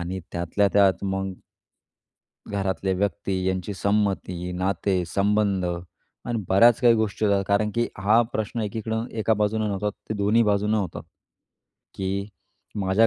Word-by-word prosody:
आणि 90 +2 -4
त्यातल्या 85 +4 +1
त्यात 100 -1 +3
मग 95 -1 -2 1.1
घरातले 95 -1 -1
व्यक्ती, 100 0 -1 0.2
यांची 95 +2 -2
संमती, 95 -3 -1
नाते, 95 0 0
संबंध, 100 0 +1 0.6
आणि 120 -2 -2
बऱ्याच 115 +5 +5
काही 120 -2 +6
गोष्टी 110 -1 -1
होत्या. 100 -1 +2
कारण 105 +1 +2
की 120 0 +1
हा 105 +4 +4
प्रश्न 110 +2 -2
एकीकडून 110 +2 -3
एका 110 +1 +2
बाजूने 105 +1 0
नव्हता, 105 +1 -1
तो 110 - -8
दोन्ही 105 +3 +3
बाजूनं 105 0 +2
होता. 95 -5 -3 0.9
की 100 +1 -2 0.5
माझ्या 100 +3 +3
100 Hz, 135 wpm, -24 LUFS, 95-110 Hz, 1.1 s, काही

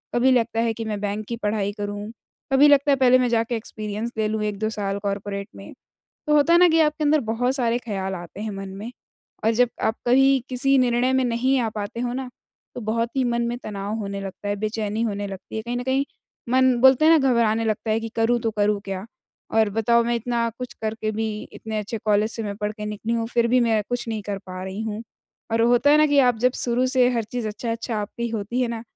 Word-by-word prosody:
कभी 255 +2 +4
लगता 230 -2 +1
है 230 -1 +1
कि 225 0 -6
मैं 210 -2 -3
बैंक 210 +1 -3
की 235 - -3
पढ़ाई 210 -2 -1
करूँ, 205 +1 -5 0.4
कभी 280 +2 +7
लगता 285 0 +5
है - - +5
पहले 255 -1 +5
मैं 250 -1 +1
जाके 230 0 0
एक्सपीरियंस 215 +1 -5
ले 215 -1 +1
लूँ 215 0 -2
1-2 210 +1 -2
साल 200 -2 -3
कॉर्पोरेट 200 0 -3
में, - - -11 0.5
तो 300 - +3
होता 300 +3 +4
है 345 - +6
ना 360 - +7
कि 325 0 +3
आपके 305 0 +1
अंदर 300 +1 +4
बहुत 245 +3 0
सारे 240 -3 +1
ख़याल 195 -5 -4
आते 175 +3 -9
हैं 215 0 -3
मन 195 -1 -6
में, 200 +5 -7 0.5
और 225 - +3
जब 245 +1 +3
आप 220 +1 +1
कहीं 270 +2 +4
किसी 270 +2 +2
निर्णय 250 0 +2
में 260 0 +3
नहीं 250 +3 +1
आ 225 - 0
पाते 210 +3 -4
हो 245 0 -2
ना, 260 0 -4 0.5
तो 245 - -5
बहुत 230 +2 -1
ही 265 - +3
मन 235 -1 0
में 240 +1 -3
तनाव 205 0 -4
होने 200 -1 -4
लगता 195 +1 -7
है, 205 - 0
बेचैनी 215 +1 -2
होने 205 -2 -2
लगती 195 +2 -9
है 220 - -2
कहीं 240 +2 -4
न 245 - -3
कहीं 265 +2 +1 0.4
मन 260 0 +4
बोलते 265 +3 +6
हैं 325 0 +7
ना 270 -1 +2
घबराने 225 -2 +2
लगता 220 0 -1
है 220 - +2
कि 225 0 -5
करूँ 235 +1 +2
तो 225 -1 0
करूँ 210 -1 +1
क्या? 195 +1 -4 0.5
और 220 -1 +3
बताओ 235 +2 +3
मैं 235 0 0
इतना 235 0 -1
कुछ 250 - -6
करके 220 0 -2
भी 220 +1 -2 0.3
इतने 220 -1 -5
अच्छे 210 +2 -4
कॉलेज 210 +1 +3
से 225 - -4
मैं 200 -1 -4
पढ़ 210 0 -2
के 210 -1 -7
निकली 210 +2 -3
हूँ 230 -1 0
फिर 235 0 +1
भी 250 +2 +3
मैं 225 -2 +2
कुछ 245 -1 -2
नहीं 220 -2 -3
कर 200 -1 -3
पा 185 0 -6
रही 190 +3 -5
हूँ। 220 -1 -4 0.5
और 225 0 +2
होता 245 +4 +4
है 300 - +6
ना 305 - +5
कि 290 -1 +4
आप 245 -4 +4
जब 250 +1 +3
शुरू 245 +1 +1
से 255 -1 +3
हर 230 -2 0
चीज़ 230 +1 -4
अच्छा-अच्छा 230 +2 -4
आपकी 235 +3 -4
होती 225 +2 -3
है 245 - +1
ना 230 -1 -4
225 Hz, 240 wpm, -23 LUFS, 210-245 Hz, 0.5 s, कभी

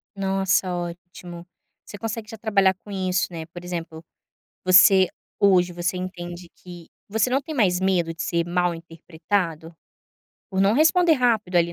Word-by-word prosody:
Nossa, 190 -1 0
ótimo. 175 0 -8 0.4
Você 205 - -10
consegue 220 0 -5
já 225 - -9
trabalhar 200 -3 +2
com 205 - -11
isso, 185 -3 -1
né, 165 -2 -6
por 175 +1 -11
exemplo, 165 -2 -6 0.6
você 185 0 +6 0.3
hoje 180 -3 +4
você 175 +1 -2
entende 175 -1 -7
que 175 -2 -12 0.2
você 220 +3 +1
não 265 +2 +2
tem 315 0 -7
mais 185 -8 +2
medo 180 -3 +1
de 165 - -5
ser 170 0 -1
mal-interpretado 170 -1 -3 0.8
por 190 -1 -1
não 195 +2 +3
responder 330 +4 +4
rápido, 225 -9 +1
ali, 170 0 +2
180 Hz, 150 wpm, -23 LUFS, 175-200 Hz, 0.8 s, você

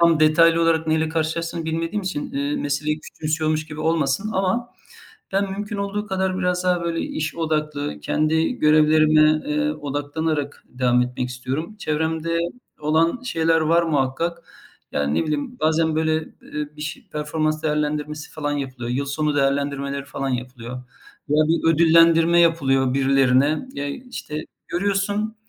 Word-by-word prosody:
tam 170 -2 +4
detaylı 165 +2 +5
olarak 165 -1 +2
neyle 160 0 +1
karşılaştığını 165 +1 -2
bilmediğim 165 +5 -2
için, 185 -6 -4
eee, 140 +1 -1
meseleyi 150 +2 -1
küçümsüyormuş 155 0 -2
gibi 150 0 -8
olmasın 160 +4 0
ama 195 +5 0 0.6
ben 195 0 +1
mümkün 205 +2 -4
olduğu 200 +1 -3
kadar 190 -2 -1
biraz 180 -1 0
daha, 180 -1 +2
böyle, 170 -1 -1
iş 155 0 -3
odaklı 150 - -2
kendi 155 - +1
görevlerime, 155 -5 +4 0.2
eee, 300 0 0
odaklanarak 145 - -3
devam 125 -1 +2
etmek 125 0 -3
istiyorum. 135 - -4
Çevremde 160 0 -1 0.4
olan 160 +8 +2
şeyler 165 -8 +2
var 165 +2 +3
muhakkak. 165 +2 -1 0.5
Yani 70 0 0
ne - - 0
bileyim 155 +12 -3
bazen 160 -1 +2
böyle, 160 0 +1 0.3
eee, 150 -1 -5
bir 150 - -7
ş 150 - -5
performans 155 +1 -1
değerlendirmesi 150 0 -2
falan 145 -2 -3
yapılıyor. 130 -4 -4
Yıl 135 +3 -1
sonu 150 +1 -1
değerlendirmeleri 140 0 0
falan 135 0 -4
yapılıyor. 125 -1 -5 0.6
Ya, 150 - +2
bir 165 0 +3
ödüllendirme 165 +1 +5
yapılıyor 135 -6 +3
birilerine. 135 - +3
Ya, 145 0 -3
işte, 155 - -6 0.3
görüyorsun. 200 +3 -1
155 Hz, 140 wpm, -22 LUFS, 145-165 Hz, 0.6 s, detaylı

